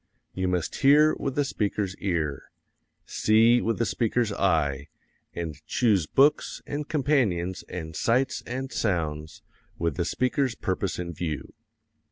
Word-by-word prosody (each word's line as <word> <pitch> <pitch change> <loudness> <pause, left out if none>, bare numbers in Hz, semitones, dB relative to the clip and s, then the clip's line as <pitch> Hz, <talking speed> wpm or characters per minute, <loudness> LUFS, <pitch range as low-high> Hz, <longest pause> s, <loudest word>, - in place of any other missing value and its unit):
You 95 0 -1
must 90 -3 -1
hear 150 +3 +5
with 135 -1 -3
the 145 - +1
speaker's 100 -6 -2
ear, 80 -8 -2 0.6
see 115 +3 +4
with 115 0 -1
the 115 - +1
speaker's 115 -1 0
eye, 75 -8 +1 0.5
and 80 -3 -5
choose 105 - +2
books 140 - +2
and 145 0 -4
companions 125 - 0
and 80 -3 -6
sights 130 +4 +1
and 130 +2 -4
sounds 80 -6 -2 0.3
with 85 -4 -1
the 85 - 0
speaker's 130 +4 0
purpose 95 -1 -2
in 85 -1 -4
view. 80 -2 -5
100 Hz, 135 wpm, -26 LUFS, 85-125 Hz, 0.6 s, hear